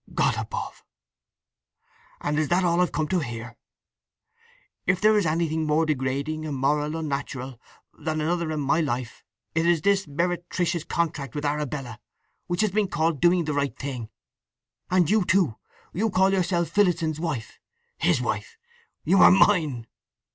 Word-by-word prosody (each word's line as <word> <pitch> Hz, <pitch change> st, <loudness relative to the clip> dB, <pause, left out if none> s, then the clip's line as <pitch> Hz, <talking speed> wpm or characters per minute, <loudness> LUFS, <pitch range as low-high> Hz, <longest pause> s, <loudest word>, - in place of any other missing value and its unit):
"God -, -, +2 dB
above—and 150 Hz, +1 st, -8 dB
is 155 Hz, -, +1 dB
that 180 Hz, +4 st, +2 dB
all 175 Hz, 0 st, +2 dB
I've 180 Hz, -, +1 dB
come 155 Hz, -1 st, -1 dB
to 185 Hz, -, +2 dB
hear? 120 Hz, -4 st, -6 dB, 1.3 s
If 180 Hz, 0 st, +2 dB
there 215 Hz, +2 st, +4 dB
is 205 Hz, -5 st, +2 dB
anything 160 Hz, 0 st, 0 dB
more 155 Hz, +2 st, +2 dB
degrading, 140 Hz, +2 st, -2 dB
immoral, 150 Hz, +1 st, 0 dB
unnatural, 135 Hz, -5 st, -4 dB, 0.3 s
than 155 Hz, 0 st, -3 dB
another 165 Hz, +1 st, -1 dB
in 155 Hz, -1 st, -2 dB
my 140 Hz, +3 st, +2 dB
life, 125 Hz, -5 st, -3 dB, 0.3 s
it 160 Hz, +1 st, +1 dB
is 170 Hz, -3 st, +2 dB
this 200 Hz, -2 st, +2 dB
meretricious 175 Hz, +1 st, -1 dB
contract 145 Hz, -6 st, -2 dB
with 145 Hz, 0 st, -3 dB
Arabella 145 Hz, -5 st, -3 dB, 0.5 s
which 175 Hz, +2 st, 0 dB
has 215 Hz, -2 st, +1 dB
been 210 Hz, +1 st, +1 dB
called 165 Hz, -4 st, 0 dB
doing 175 Hz, -1 st, +4 dB
the 150 Hz, -, -1 dB
right 140 Hz, -1 st, -1 dB
thing! 125 Hz, -5 st, -5 dB, 0.8 s
And 180 Hz, -3 st, +3 dB
you 215 Hz, +2 st, +3 dB
too—you 185 Hz, -, -1 dB
call 190 Hz, 0 st, +3 dB
yourself 175 Hz, -2 st, +1 dB
Phillotson's 170 Hz, -6 st, +1 dB
wife! 150 Hz, -9 st, -4 dB, 0.4 s
His -, -, +2 dB
wife! 465 Hz, -1 st, -3 dB, 0.5 s
You 195 Hz, -, +3 dB
are -, -, +9 dB
mine." 160 Hz, -, +3 dB
160 Hz, 145 wpm, -25 LUFS, 145-180 Hz, 1.3 s, are